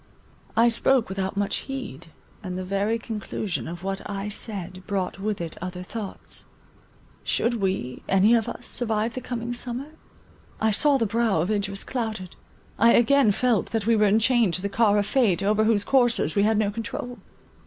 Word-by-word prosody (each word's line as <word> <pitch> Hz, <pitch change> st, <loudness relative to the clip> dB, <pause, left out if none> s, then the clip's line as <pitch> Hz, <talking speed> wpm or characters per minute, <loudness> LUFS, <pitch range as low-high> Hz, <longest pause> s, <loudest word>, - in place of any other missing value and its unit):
I 230 Hz, +1 st, +6 dB
spoke 240 Hz, 0 st, +2 dB
without 190 Hz, 0 st, -3 dB
much 205 Hz, 0 st, 0 dB
heed, 245 Hz, -, -6 dB, 0.3 s
and 185 Hz, -3 st, -5 dB
the 185 Hz, -, -3 dB
very 200 Hz, +4 st, 0 dB
conclusion 215 Hz, -4 st, -4 dB
of 175 Hz, +2 st, -7 dB
what 195 Hz, 0 st, -3 dB
I 200 Hz, 0 st, -3 dB
said 190 Hz, -4 st, -6 dB
brought 195 Hz, -2 st, -2 dB
with 210 Hz, +1 st, -2 dB
it 165 Hz, -2 st, -5 dB
other 180 Hz, 0 st, -5 dB
thoughts. 205 Hz, +1 st, -7 dB, 0.8 s
Should 235 Hz, -2 st, 0 dB
we, 185 Hz, -10 st, -2 dB
any 195 Hz, +4 st, +5 dB
of 230 Hz, -2 st, +2 dB
us, -, -, -7 dB
survive 225 Hz, -1 st, -1 dB
the 255 Hz, -, -5 dB
coming 240 Hz, -1 st, -4 dB
summer? 245 Hz, +3 st, -4 dB, 0.7 s
I 220 Hz, 0 st, +2 dB
saw 285 Hz, +6 st, +4 dB
the 230 Hz, -, +1 dB
brow 225 Hz, -4 st, +1 dB
of 180 Hz, +6 st, -1 dB
Idris 200 Hz, -1 st, -2 dB
clouded; 220 Hz, -7 st, -4 dB, 0.4 s
I 230 Hz, +2 st, +6 dB
again 245 Hz, -1 st, +5 dB
felt, 235 Hz, +1 st, +1 dB
that 225 Hz, -3 st, -2 dB
we 230 Hz, 0 st, +4 dB
were 210 Hz, -1 st, +4 dB
enchained 220 Hz, -1 st, +3 dB
to 185 Hz, -, -4 dB
the 200 Hz, -, -1 dB
car 210 Hz, 0 st, +3 dB
of 205 Hz, -, +2 dB
fate, 210 Hz, -6 st, +2 dB
over 215 Hz, +2 st, +2 dB
whose 215 Hz, -2 st, +3 dB
coursers 240 Hz, -, +2 dB
we 200 Hz, -, +2 dB
had 215 Hz, +1 st, +3 dB
no 210 Hz, -1 st, +1 dB
control. 230 Hz, +2 st, -5 dB
215 Hz, 180 wpm, -25 LUFS, 195-235 Hz, 0.8 s, I